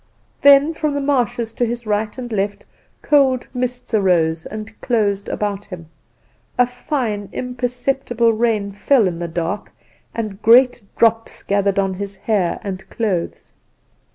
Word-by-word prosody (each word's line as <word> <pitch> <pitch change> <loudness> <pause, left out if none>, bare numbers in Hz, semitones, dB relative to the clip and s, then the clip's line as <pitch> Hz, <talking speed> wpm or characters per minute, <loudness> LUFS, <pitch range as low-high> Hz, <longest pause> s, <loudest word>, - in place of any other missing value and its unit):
"Then 285 +3 +6
from 305 -2 -1
the - - 0
marshes 245 -5 0
to 245 - -1
his 235 0 -2
right 210 +1 -1
and 245 -2 -6
left 200 -1 -2 0.4
cold 270 -4 +3
mists 250 -1 -3
arose 170 -6 +2
and 215 +1 -8
closed 205 -4 0
about 205 -1 -2
him. 170 -4 -10 0.7
A 250 - +5
fine, 245 -5 -3
imperceptible 245 -1 -1
rain 215 -3 0
fell 215 +2 +3
in 170 -2 -3
the 170 - -3
dark, 170 +5 -3 0.4
and 215 -3 -4
great 245 +2 +5 0.2
drops 225 0 +1
gathered 200 0 +1
on 195 -1 +1
his 200 +1 -6
hair 190 -4 0
and 190 -2 -6
clothes. 195 -7 -3
220 Hz, 140 wpm, -20 LUFS, 200-245 Hz, 0.7 s, Then